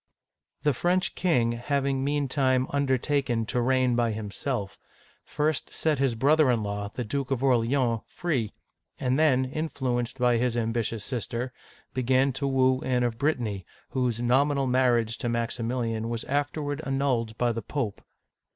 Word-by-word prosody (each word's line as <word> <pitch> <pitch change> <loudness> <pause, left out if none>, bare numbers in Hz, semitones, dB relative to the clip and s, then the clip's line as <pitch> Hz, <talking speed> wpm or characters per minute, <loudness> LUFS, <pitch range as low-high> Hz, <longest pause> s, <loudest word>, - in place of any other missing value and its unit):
The 150 - +3
French 180 +7 +1
king, 125 -11 +2
having 135 +2 -1
meantime 135 -2 +1
undertaken 135 -3 +1
to 120 +3 -1
reign 130 0 +2
by 120 -2 +1
himself, 105 0 -4 0.4
first 150 +1 -1
set 155 -4 0
his 135 -4 +2
brother 145 +4 +4
in 115 -3 +2
law, 100 0 -3
the 125 - -4
Duke 135 +3 -3
of 135 -1 -1
Orleans, 120 -2 +2
free, 135 - -2 0.5
and 130 +2 +1
then, 130 -5 +4
influenced 130 -4 -2
by 125 -2 +3
his 120 0 0
ambitious 115 -2 -1
sister, 125 0 -3 0.4
began 130 +1 +2
to 140 +2 -2
woo 130 -1 +3
Anne 125 -1 +1
of 120 -1 -1
Brittany,' 120 -10 0 0.3
whose 125 -3 -1
nominal 135 +3 +2
marriage 120 -3 +2
to 120 - -2
Maximilian 115 -1 -2
was 115 -1 -3
afterward 145 +1 -2
annulled 130 -5 0
by 120 -1 +2
the 115 0 -3
Pope. 120 -8 -3
125 Hz, 145 wpm, -27 LUFS, 115-140 Hz, 0.5 s, brother